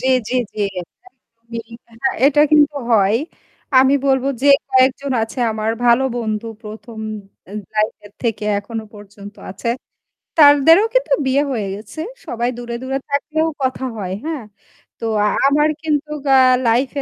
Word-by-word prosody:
জ্বী, 260 - -1 0.2
জ্বী, 255 - -1 0.2
জ্বী। 230 - -7 0.4
হ্যাঁ, 265 - +1
এটা 295 +1 +4
কিন্তু 295 -1 +4 0.2
হয়। 205 0 +4 0.6
আমি 265 +1 +4
বলব 265 -1 +2 0.2
যে 285 - +4 0.2
কয়েকজন 260 +1 +2
আছে 225 +4 -5
আমার 215 0 -2 0.2
ভালো 240 +2 +4
বন্ধু 220 -1 -3 0.2
১ম 220 +1 -10 0.5
আ - - -11 0.2
লাইফ 215 0 +1
এর 205 - -17
থেকে 225 -3 -2
এখনো 220 +2 -6
পর্যন্ত 205 0 -12 0.2
আছে। 200 +5 -3 0.7
তাদেরও 300 +6 +7
কিন্তু - - +2
বিয়ে 270 +2 +2
হয়ে 215 -6 -2
গেছে। 220 +9 -8 0.3
সবাই 240 +1 -1
দূরে, 240 -1 -6
দূরে 270 +1 -2
থাকলেও 310 +3 0 0.2
কথা 260 0 -1
হয় 185 -3 -4
হ্যাঁ। 310 -8 -4 0.5
তো - - -5 0.4
আমার 295 +2 +3
কিন্তু 300 -1 -1 0.3
আ - - +7 0.3
লাইফ 245 +4 +2
245 Hz, 140 wpm, -19 LUFS, 215-280 Hz, 0.7 s, তাদেরও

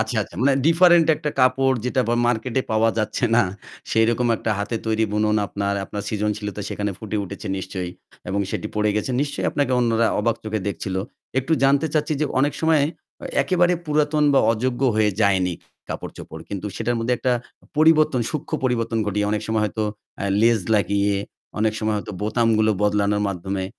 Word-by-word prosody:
আচ্ছা, 110 +1 -2
আচ্ছা। - - -12
মানে 140 +2 +4
ডিফারেন্ট 170 0 +6
একটা 150 -1 -3
কাপড় 130 0 +3
যেটা 125 +1 +1
বা 120 - +2
মার্কেটে 120 +2 0
পাওয়া 110 +1 +3
যাচ্ছে 110 +3 -1
না। 120 - +5 0.5
সেরকম 115 +2 +2
একটা 110 - -3
হাতে 105 +3 -2
তৈরি 110 0 +1
বুনন 105 0 +2
আপনার, 100 +1 -2
আপনার 100 +1 -6
সৃজনশীলতা 105 -1 -2
সেখানে 105 0 -2
ফুটে 110 -1 -4
উঠেছে 100 - -8
নিশ্চয়ই। 90 -1 -5 0.4
এবং 100 +2 0
সেটি - - -3
পড়ে 105 0 +2
গেছে। 105 - -1
নিশ্চয়ই 145 -1 -2
আপনাকে 145 -3 0
অন্যরা 115 -1 +2
অবাক 115 +1 +1
চোখে 110 -1 -2
দেখছিল? 95 -1 -4 0.4
একটু 135 +5 -1
জানতে 140 +3 +3
চাচ্ছি 155 +1 +1
যে - - +3 0.2
অনেক 145 0 +2
সময় 160 -3 +3 0.4
অ - - -6 0.2
একেবারে 180 -1 +2
পুরাতন 150 0 +2
বা - - +6
অযোগ্য 120 +3 -2 0.2
হয়ে 105 -1 +3
যায়নি 95 -3 +2 0.3
কাপড়-চোপড়। - - -7
কিন্তু 100 0 -4
সেটার 120 +1 -1
মধ্যে 120 +2 +1
একটা 125 - +1 0.4
পরিবর্তন 155 -4 +4
সূক্ষ্ম 155 -3 -5
পরিবর্তন 115 -2 0
ঘটিয়ে 105 0 0
অনেক 105 0 -1
সময় 110 -1 0
হয়তো 110 +1 -2 0.4
অ্যা 100 - -2 0.2
লেজ 115 -2 +4
লাগিয়ে, 100 0 +2 0.4
অনেক 110 0 +2
সময় 110 0 0
হয়তো 105 - -5
বোতামগুলো 110 0 +2
বদলানোর 105 0 +2
মাধ্যমে, 95 0 -3
110 Hz, 170 wpm, -22 LUFS, 105-130 Hz, 0.5 s, ডিফারেন্ট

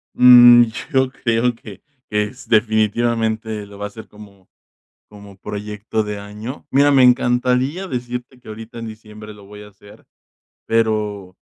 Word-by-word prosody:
Mm, 120 -1 +8 0.3
yo 130 -2 +2
creo 120 -1 -1
que 105 -4 -13 0.3
que 105 0 +1
es 130 +6 -10
definitivamente 110 -1 0
lo 100 0 -14
voy 100 - -8
a - - -2
hacer 110 +2 -12
como 100 -3 -17 0.6
como 100 -1 -15
proyecto 105 +2 -5
de 105 0 -6
año. 105 +6 -9
Mira, 140 +2 +4
me 135 -2 +5
encantaría 125 +7 +1
decirte 125 -2 -6
que 125 - -21
ahorita 110 +2 -10
en 115 - -7
diciembre 110 -1 -12
lo 100 -1 -16
voy 105 +1 -13
a 105 - -12
hacer, 105 0 -18 0.6
pero 105 -4 -1
110 Hz, 150 wpm, -19 LUFS, 105-125 Hz, 0.6 s, Mm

